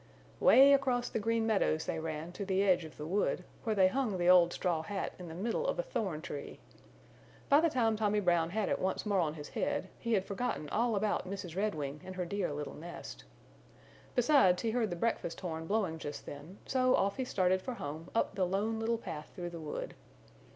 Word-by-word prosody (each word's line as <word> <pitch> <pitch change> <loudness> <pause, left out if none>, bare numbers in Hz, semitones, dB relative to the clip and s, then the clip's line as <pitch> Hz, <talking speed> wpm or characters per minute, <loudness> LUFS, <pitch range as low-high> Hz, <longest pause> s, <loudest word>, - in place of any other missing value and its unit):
Way 275 +4 +8
across 255 -3 +2
the - - -2
Green 225 +1 +1
Meadows 195 -7 +1
they - - -2
ran 160 +1 -4
to 200 - -5
the 195 0 +1
edge 180 -4 +3
of 155 - -12
the 150 - -6
wood, 185 +1 0 0.2
where 220 -2 0
they 190 -2 +6
hung 220 -1 0
the 175 0 +2
old 175 -1 +6
straw 175 -4 0
hat 195 +4 -4
in 180 - -7
the 160 - -8
middle 230 - -1
of - - 0
a - - 0
thorn 190 - -3
tree. 145 -4 -7 0.9
By 285 +1 +6
the 335 - +3
time 230 -6 +2
Tommy 210 -1 +2
Brown 175 -4 +2
had 210 +3 -1
it - - 0
once 190 +3 -1
more 200 -2 +2
on 155 -3 0
his 150 -2 -8
head - - -2
he 235 -1 -1
had 195 -3 +2
forgotten 200 -6 -3
all 230 +6 +1
about 200 -2 0
Mrs. 185 -4 -6
Redwing 150 -8 -2
and 185 - -8
her 180 -1 -2
dear 195 -2 -2
little 145 0 -5
nest. 170 +3 -9 0.9
Besides, 245 -8 +4
he 225 - +1
heard 230 -2 +1
the 175 - -3
breakfast 175 -3 -1
horn 160 -3 -5
blowing 195 -6 0
just 145 0 -6
then, 150 +7 -9
so 255 -1 +3
off 195 +1 +1
he 260 - 0
started 185 -5 +1
for 250 +5 -5
home 155 -1 -6
up - - +1
the 185 -2 +1
Lone 210 +4 -1
Little 230 +1 0
Path 155 -9 -7
through 175 -2 -5
the 170 -1 -7
wood. 150 -1 -5
190 Hz, 215 wpm, -32 LUFS, 170-225 Hz, 0.9 s, Way